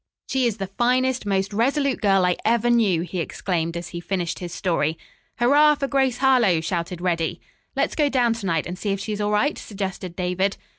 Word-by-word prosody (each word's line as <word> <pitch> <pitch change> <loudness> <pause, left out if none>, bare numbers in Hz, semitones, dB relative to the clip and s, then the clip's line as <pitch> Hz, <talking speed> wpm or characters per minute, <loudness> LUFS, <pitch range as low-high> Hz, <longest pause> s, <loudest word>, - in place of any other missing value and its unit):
"She 260 -2 +1
is 225 -2 -2
the 195 - -3
finest, 250 +4 0
most 195 0 0
resolute 270 +5 +1
girl 195 -3 +3
I 180 -1 +2
ever 235 +1 +2
knew!" 205 -8 +3
he 180 +1 -4
exclaimed 170 0 -2
as 170 - -6
he 170 - -6
finished 175 -1 -3
his 175 -1 -6
story. 165 -4 -1 0.4
"Hurrah 290 +5 +5
for 275 -1 -2
Grace 265 -3 +1
Harlowe!" 245 -10 +4
shouted 170 +1 -3
Reddy. 170 -3 -1 0.4
"Let's - - 0
go 295 -2 +2
down 245 -4 +2
to 225 -4 -5
night 165 -3 0
and 180 +1 -6
see 210 - -3
if 195 0 -1
she's 210 +1 -4
all 205 - 0
right?" 210 +8 +1
suggested 190 -3 -5
David. 185 +2 -1
200 Hz, 200 wpm, -23 LUFS, 180-240 Hz, 0.4 s, Hurrah